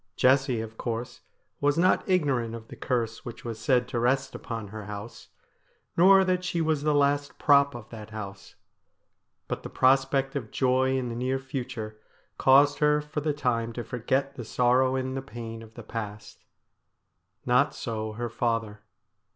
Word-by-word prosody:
Jessie, 130 Hz, -2 st, +3 dB
of 110 Hz, 0 st, -9 dB
course, 120 Hz, 0 st, -4 dB, 0.4 s
was 145 Hz, +1 st, +2 dB
not 185 Hz, +3 st, +3 dB
ignorant 135 Hz, -11 st, +1 dB
of 115 Hz, -1 st, -10 dB
the -, -, -9 dB
curse 115 Hz, -3 st, -2 dB
which 120 Hz, 0 st, -9 dB
was 115 Hz, -2 st, -5 dB
said 125 Hz, +2 st, +2 dB
to 120 Hz, -, -1 dB
rest 130 Hz, +3 st, +1 dB
upon 115 Hz, -3 st, -6 dB
her 110 Hz, 0 st, -7 dB
house; 105 Hz, +2 st, -8 dB, 0.7 s
nor 190 Hz, +2 st, +7 dB
that 185 Hz, -1 st, +1 dB
she 175 Hz, -1 st, -1 dB
was 160 Hz, -3 st, +1 dB
the 150 Hz, 0 st, +2 dB
last 145 Hz, 0 st, +1 dB
prop 140 Hz, -2 st, +4 dB
of 120 Hz, -2 st, -9 dB
that 110 Hz, -2 st, -9 dB
house. 100 Hz, -3 st, -8 dB, 0.9 s
But -, -, -3 dB
the -, -, -7 dB
prospect 135 Hz, +1 st, +2 dB
of 120 Hz, -6 st, -3 dB
joy 130 Hz, +1 st, +2 dB
in 125 Hz, -2 st, -2 dB
the 115 Hz, -, -4 dB
near 130 Hz, +2 st, 0 dB
future 125 Hz, -5 st, -6 dB, 0.4 s
caused 140 Hz, +2 st, +5 dB
her 150 Hz, 0 st, +4 dB
for 150 Hz, 0 st, -4 dB
the 150 Hz, +1 st, 0 dB
time 115 Hz, -5 st, -1 dB
to 120 Hz, -, -4 dB
forget 130 Hz, +4 st, -1 dB
the 120 Hz, -, -7 dB
sorrow 125 Hz, +3 st, +2 dB
and 130 Hz, 0 st, -2 dB
the 135 Hz, -, -2 dB
pain 115 Hz, -4 st, -8 dB
of 110 Hz, 0 st, -14 dB
the 120 Hz, -, -9 dB
past. 105 Hz, -2 st, -7 dB, 1.0 s
Not 125 Hz, +4 st, +3 dB
so 110 Hz, -2 st, -4 dB
her 120 Hz, +2 st, -3 dB
father. 115 Hz, -3 st, -1 dB
125 Hz, 170 wpm, -27 LUFS, 115-140 Hz, 1.0 s, nor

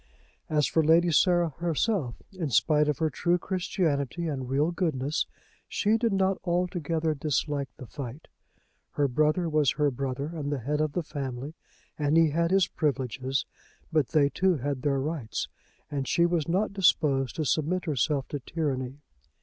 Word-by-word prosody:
As 150 Hz, -2 st, +2 dB
for 160 Hz, -, +2 dB
Lady 165 Hz, +3 st, +4 dB
Sarah 175 Hz, +2 st, +4 dB
herself, 170 Hz, -, -1 dB
in 170 Hz, -6 st, -3 dB
spite 150 Hz, +4 st, +3 dB
of 150 Hz, -3 st, 0 dB
her 160 Hz, -1 st, 0 dB
true 175 Hz, 0 st, +1 dB
Christianity 170 Hz, -4 st, -1 dB
and 130 Hz, -5 st, -3 dB
real 145 Hz, +5 st, +2 dB
goodness, 155 Hz, -5 st, -1 dB, 0.4 s
she 215 Hz, +1 st, +1 dB
did 230 Hz, 0 st, +1 dB
not 190 Hz, 0 st, +1 dB
altogether 170 Hz, -3 st, 0 dB
dislike 145 Hz, -1 st, -1 dB
the 130 Hz, -, -9 dB
fight. 135 Hz, +3 st, -8 dB, 0.7 s
Her 145 Hz, -1 st, +2 dB
brother 155 Hz, +6 st, +2 dB
was 150 Hz, -4 st, +2 dB
her 150 Hz, -2 st, +1 dB
brother, 135 Hz, +1 st, -3 dB
and 150 Hz, -3 st, -3 dB
the 145 Hz, -, 0 dB
head 145 Hz, +5 st, -1 dB
of 155 Hz, -2 st, 0 dB
the 175 Hz, -, -1 dB
family, 140 Hz, -1 st, -5 dB, 0.5 s
and 150 Hz, +2 st, +2 dB
he 165 Hz, -2 st, +5 dB
had 170 Hz, +2 st, +1 dB
his 190 Hz, -1 st, +4 dB
privileges; 135 Hz, -4 st, -1 dB, 0.5 s
but 155 Hz, -5 st, +2 dB
they 145 Hz, -3 st, +3 dB
too 185 Hz, +2 st, +2 dB
had 140 Hz, 0 st, -3 dB
their 140 Hz, -1 st, +1 dB
rights, 140 Hz, -5 st, -3 dB, 0.4 s
and 140 Hz, -2 st, -2 dB
she 170 Hz, -, +3 dB
was 170 Hz, -4 st, 0 dB
not 195 Hz, +4 st, 0 dB
disposed 145 Hz, -9 st, +2 dB
to 155 Hz, -, -1 dB
submit 165 Hz, +6 st, 0 dB
herself 140 Hz, -2 st, 0 dB
to 145 Hz, -, -3 dB
tyranny. 135 Hz, -2 st, -3 dB
150 Hz, 165 wpm, -28 LUFS, 140-170 Hz, 0.7 s, he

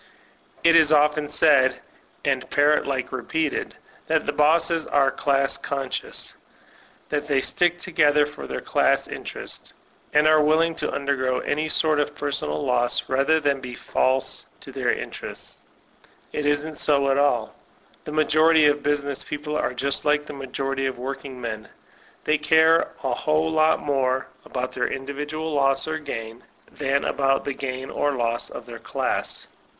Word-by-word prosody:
It 170 Hz, 0 st, +6 dB
is 160 Hz, -2 st, +6 dB
often 150 Hz, 0 st, +3 dB
said, 140 Hz, -4 st, +4 dB, 0.5 s
and -, -, 0 dB
parrot 145 Hz, +1 st, +3 dB
like 130 Hz, -2 st, -2 dB
repeated, 145 Hz, +5 st, -2 dB, 0.3 s
that -, -, +1 dB
the -, -, -1 dB
bosses 165 Hz, +2 st, +2 dB
are 135 Hz, -1 st, +3 dB
"class 135 Hz, 0 st, +1 dB
conscious," 135 Hz, -2 st, -4 dB, 0.7 s
that 145 Hz, -1 st, -2 dB
they 140 Hz, -2 st, +2 dB
stick 175 Hz, +5 st, +2 dB
together 150 Hz, -4 st, +2 dB
for 150 Hz, 0 st, -9 dB
their -, -, -4 dB
class -, -, +1 dB
interest, -, -, -6 dB, 0.4 s
and 150 Hz, +1 st, +4 dB
are 155 Hz, 0 st, +5 dB
willing 160 Hz, +2 st, +3 dB
to 150 Hz, -, -1 dB
undergo 130 Hz, -2 st, -1 dB
any 155 Hz, +2 st, -1 dB
sort 155 Hz, -1 st, +4 dB
of 145 Hz, 0 st, -1 dB
personal 135 Hz, -, -2 dB
loss 120 Hz, -1 st, +1 dB
rather 140 Hz, +4 st, +2 dB
than 140 Hz, -3 st, 0 dB
be 125 Hz, -1 st, -7 dB
false 130 Hz, +1 st, 0 dB, 0.2 s
to -, -, -10 dB
those -, -, 0 dB
interests. -, -, -7 dB, 0.7 s
It 150 Hz, -, -1 dB
isn't 145 Hz, +1 st, -1 dB
80 140 Hz, -2 st, +3 dB
at 135 Hz, 0 st, +2 dB
all. 125 Hz, -6 st, +1 dB, 0.5 s
The -, -, -7 dB
majority 155 Hz, +1 st, +4 dB
of 145 Hz, 0 st, +3 dB
business 145 Hz, -1 st, -1 dB
people 150 Hz, 0 st, -5 dB
are -, -, 0 dB
just 140 Hz, +2 st, 0 dB
like 150 Hz, 0 st, +2 dB
the 150 Hz, -, -8 dB
majority 135 Hz, 0 st, -3 dB
of 130 Hz, -, -4 dB
workingmen; 125 Hz, -4 st, -6 dB, 0.6 s
they 155 Hz, 0 st, +1 dB
care 160 Hz, +2 st, +4 dB
a 130 Hz, -2 st, 0 dB
whole 155 Hz, +5 st, 0 dB
fat 155 Hz, 0 st, +4 dB
more 130 Hz, -2 st, 0 dB, 0.2 s
about 125 Hz, 0 st, -4 dB
their 125 Hz, -, -1 dB
individual 145 Hz, +4 st, -4 dB
loss 135 Hz, 0 st, +2 dB
or 155 Hz, 0 st, -2 dB
gain 115 Hz, -5 st, -7 dB, 0.3 s
than 135 Hz, +1 st, 0 dB
about 135 Hz, -1 st, +1 dB
the 140 Hz, -, -2 dB
gain 130 Hz, -1 st, -5 dB
or 145 Hz, 0 st, 0 dB
loss 120 Hz, -2 st, -1 dB
of -, -, -9 dB
their -, -, -9 dB
class. -, -, -3 dB
145 Hz, 155 wpm, -23 LUFS, 135-155 Hz, 0.7 s, It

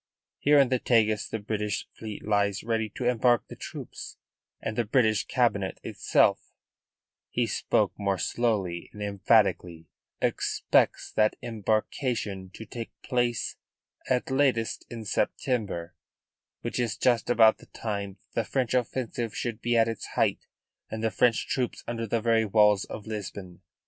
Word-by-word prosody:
Here 145 Hz, +1 st, +5 dB
in 135 Hz, -3 st, +5 dB
the 130 Hz, -1 st, +2 dB
Tagus 110 Hz, -4 st, +2 dB
the -, -, -2 dB
British 105 Hz, -1 st, -3 dB
fleet 110 Hz, -2 st, -8 dB
lies 100 Hz, -2 st, +1 dB
ready 110 Hz, -1 st, 0 dB
to 125 Hz, -, -3 dB
embark 120 Hz, -2 st, +3 dB
the -, -, -8 dB
troops, -, -, -8 dB, 0.4 s
and 110 Hz, -, -4 dB
the 120 Hz, -, +1 dB
British 110 Hz, -2 st, +2 dB
Cabinet -, -, +1 dB
itself" -, -, +2 dB, 0.9 s
(he -, -, +1 dB
spoke -, -, +1 dB
more 100 Hz, -1 st, 0 dB
slowly 95 Hz, -3 st, -1 dB
and 105 Hz, -, -6 dB
emphatically) 100 Hz, -5 st, +2 dB, 0.3 s
"expects -, -, +1 dB
that 110 Hz, 0 st, +2 dB
embarkation 110 Hz, -2 st, -1 dB
to 110 Hz, -, -8 dB
take 115 Hz, 0 st, -7 dB
place 120 Hz, -2 st, 0 dB, 0.5 s
at 125 Hz, +1 st, +1 dB
latest 130 Hz, -6 st, +1 dB
in 115 Hz, -2 st, -7 dB
September, 100 Hz, -5 st, -1 dB, 0.7 s
which -, -, -3 dB
is 115 Hz, -3 st, -1 dB
just 120 Hz, -3 st, +2 dB
about 110 Hz, -2 st, +6 dB
the -, -, -16 dB
time 100 Hz, -3 st, -4 dB, 0.2 s
that -, -, +1 dB
the -, -, -5 dB
French 125 Hz, -3 st, 0 dB
offensive 120 Hz, -2 st, -1 dB
should 115 Hz, -1 st, -3 dB
be 120 Hz, 0 st, +1 dB
at 115 Hz, 0 st, +5 dB
its 115 Hz, -2 st, -4 dB
height -, -, +1 dB, 0.4 s
and 110 Hz, 0 st, -5 dB
the 110 Hz, -, +1 dB
French 115 Hz, +4 st, +2 dB
troops 125 Hz, -2 st, -2 dB
under 115 Hz, -1 st, -3 dB
the 115 Hz, +2 st, 0 dB
very 115 Hz, 0 st, +3 dB
walls 105 Hz, -1 st, +4 dB
of 105 Hz, -, -8 dB
Lisbon. 100 Hz, -4 st, -6 dB
110 Hz, 150 wpm, -28 LUFS, 105-120 Hz, 0.9 s, about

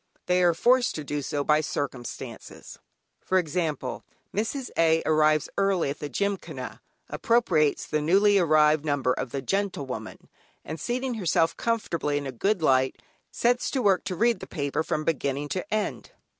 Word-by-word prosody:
They 180 Hz, 0 st, +2 dB
are 175 Hz, -2 st, +4 dB
forced 250 Hz, +6 st, +3 dB
to 155 Hz, -, -4 dB
do 145 Hz, 0 st, -3 dB
so 145 Hz, +1 st, -2 dB
by 150 Hz, +1 st, +3 dB
circumstances. 135 Hz, -5 st, -6 dB, 0.4 s
For 185 Hz, -, +1 dB
example, 155 Hz, -6 st, -2 dB, 0.3 s
Mrs. 235 Hz, +5 st, -2 dB
A. 165 Hz, 0 st, +3 dB
arrives 155 Hz, -1 st, +3 dB
early 195 Hz, -7 st, +1 dB
at 145 Hz, -, -7 dB
the 145 Hz, -, -5 dB
Gymkhana, 200 Hz, +8 st, -3 dB, 0.3 s
appropriates 175 Hz, -11 st, +1 dB
the 155 Hz, -, -1 dB
newly 200 Hz, +6 st, +4 dB
arrived 155 Hz, -3 st, +4 dB
number 145 Hz, -4 st, +1 dB
of 130 Hz, -, -4 dB
the 135 Hz, +2 st, -4 dB
"Gentlewoman," 140 Hz, -, -3 dB, 0.4 s
and 160 Hz, +2 st, -6 dB
seating 250 Hz, +1 st, -2 dB
herself 170 Hz, -6 st, +1 dB
comfortably 170 Hz, -10 st, -1 dB
in 145 Hz, -, -4 dB
a 135 Hz, -, -4 dB
good 190 Hz, -, 0 dB
light, 130 Hz, -2 st, +2 dB, 0.3 s
sets 245 Hz, +1 st, +1 dB
to 260 Hz, -3 st, -1 dB
work 195 Hz, -3 st, +3 dB
to 190 Hz, -2 st, -3 dB
read 235 Hz, +5 st, +2 dB
the -, -, -8 dB
paper 145 Hz, -1 st, -2 dB
from 155 Hz, -1 st, -2 dB
beginning 145 Hz, -2 st, -1 dB
to 185 Hz, -, -4 dB
end. 215 Hz, 0 st, -2 dB
160 Hz, 160 wpm, -26 LUFS, 145-200 Hz, 0.4 s, are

